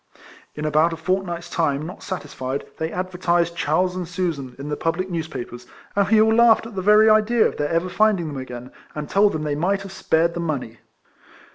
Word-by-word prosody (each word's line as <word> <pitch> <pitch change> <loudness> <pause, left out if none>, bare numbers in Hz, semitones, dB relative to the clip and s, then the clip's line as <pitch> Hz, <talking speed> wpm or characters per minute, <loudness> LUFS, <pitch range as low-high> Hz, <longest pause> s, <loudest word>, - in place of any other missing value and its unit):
In 150 - -4
about 155 +2 +3
a - - -5
fortnight's 175 0 -2
time, 155 -4 -1
not 180 - -9
satisfied, 140 -8 -5
they 160 +1 -2
advertised 175 -2 0
Charles 180 +4 0
and 180 -2 -4
Susan 165 -8 -3
in 140 +2 -7
the 150 - -1
public 175 +4 -2
newspapers; 140 -7 -5 0.3
and 200 -1 +2
we 220 0 +5
all 220 +1 +4
laughed 230 -1 +5
at 230 - -9
the 190 - -3
very 210 +3 +6
idea 215 +2 +4
of - - -1
their 145 0 -1
ever 170 +2 0
finding 190 -1 +2
them 145 -2 -6
again, 125 -1 -8 0.2
and 150 -1 -4
told 200 +1 +3
them 155 -1 -3
they 150 -1 -1
might 190 +7 0
have 195 - -9
spared 170 -3 +1
the 175 - -4
money. 140 -9 -4
170 Hz, 205 wpm, -22 LUFS, 150-190 Hz, 0.3 s, very